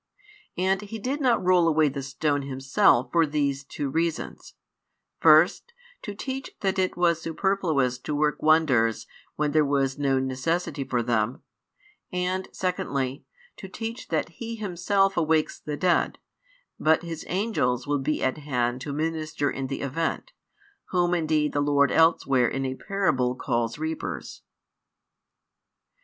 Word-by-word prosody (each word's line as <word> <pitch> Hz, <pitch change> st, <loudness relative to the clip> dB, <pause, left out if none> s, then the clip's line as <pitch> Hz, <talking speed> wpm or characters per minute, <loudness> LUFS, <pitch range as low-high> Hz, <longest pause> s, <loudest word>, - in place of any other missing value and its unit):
And 190 Hz, +2 st, +1 dB
He 210 Hz, +2 st, -7 dB
did 260 Hz, +7 st, -3 dB
not 240 Hz, -8 st, +2 dB
roll 180 Hz, -2 st, +4 dB
away 155 Hz, -1 st, +4 dB
the 140 Hz, 0 st, -3 dB
stone 145 Hz, +2 st, -1 dB
Himself 130 Hz, -2 st, +2 dB
for 165 Hz, -2 st, +3 dB
these 140 Hz, -2 st, -1 dB
two 140 Hz, +1 st, -4 dB
reasons: 165 Hz, +3 st, -3 dB, 0.6 s
first, 475 Hz, -, +5 dB, 0.3 s
to 205 Hz, -, -6 dB
teach 265 Hz, +5 st, -5 dB
that 195 Hz, -1 st, 0 dB
it 185 Hz, -1 st, 0 dB
was 170 Hz, -2 st, +2 dB
superfluous 160 Hz, -8 st, 0 dB
to 150 Hz, +3 st, -4 dB
work 150 Hz, 0 st, 0 dB
wonders 140 Hz, -8 st, +3 dB, 0.3 s
when 150 Hz, -1 st, 0 dB
there 155 Hz, +1 st, +4 dB
was 140 Hz, -1 st, 0 dB
no 135 Hz, -2 st, +2 dB
necessity 135 Hz, +3 st, -1 dB
for 125 Hz, -2 st, -1 dB
them; 115 Hz, +1 st, -1 dB, 0.7 s
and 180 Hz, +1 st, -1 dB
|125 -, -, -22 dB
secondly, 145 Hz, -8 st, -2 dB, 0.3 s
[to 190 Hz, -, -8 dB
teach] 225 Hz, +4 st, -6 dB
that 160 Hz, 0 st, -1 dB
He 230 Hz, +6 st, -7 dB
Himself 195 Hz, -1 st, 0 dB
awakes 160 Hz, -2 st, +1 dB
the 150 Hz, -1 st, -5 dB
dead, 180 Hz, +1 st, +1 dB, 0.6 s
but 160 Hz, +2 st, +3 dB
His 165 Hz, -2 st, -6 dB
angels 170 Hz, -, 0 dB
will 145 Hz, 0 st, 0 dB
be 145 Hz, +3 st, -1 dB
at 130 Hz, +3 st, 0 dB
hand 125 Hz, -4 st, -1 dB
to 145 Hz, +1 st, -5 dB
minister 155 Hz, -1 st, -2 dB
in 135 Hz, -1 st, -4 dB
the 135 Hz, -, -4 dB
event, 165 Hz, -, -2 dB, 0.5 s
whom 175 Hz, -1 st, +1 dB
indeed 155 Hz, -3 st, +1 dB
the 145 Hz, -, +1 dB
Lord 145 Hz, -1 st, +3 dB
elsewhere 135 Hz, -6 st, +3 dB
in 135 Hz, +2 st, -2 dB
a 130 Hz, -, -2 dB
parable 140 Hz, -8 st, 0 dB
calls 120 Hz, -2 st, -1 dB
reapers. 160 Hz, +1 st, -5 dB
155 Hz, 145 wpm, -26 LUFS, 135-180 Hz, 0.7 s, first